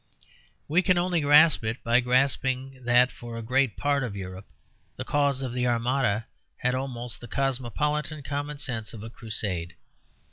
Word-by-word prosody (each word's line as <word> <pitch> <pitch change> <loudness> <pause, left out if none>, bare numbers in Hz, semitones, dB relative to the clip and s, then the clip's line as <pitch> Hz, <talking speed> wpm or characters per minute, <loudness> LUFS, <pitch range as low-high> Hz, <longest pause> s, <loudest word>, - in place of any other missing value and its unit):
We 165 +5 +3
can 185 -1 +2
only 175 -1 +1
grasp 150 0 +6
it 110 +2 -3
by 120 +1 +4
grasping 130 +1 0
that 125 +1 +5
for 120 -1 -9
a 115 - -5
great 125 -1 +1
part 145 -1 +1
of 110 -5 -4
Europe 95 0 -7 0.5
the - - -6
cause 140 -2 +1
of 125 -2 -4
the 125 0 0
Armada 120 -2 +1 0.3
had 125 0 0
almost 125 -3 -4
the 120 - -9
cosmopolitan 140 +4 -2
common 145 +1 -4
sense 120 -6 -4
of 105 - -9
a 115 - -8
crusade. 95 -7 -4
125 Hz, 165 wpm, -26 LUFS, 115-140 Hz, 0.5 s, grasp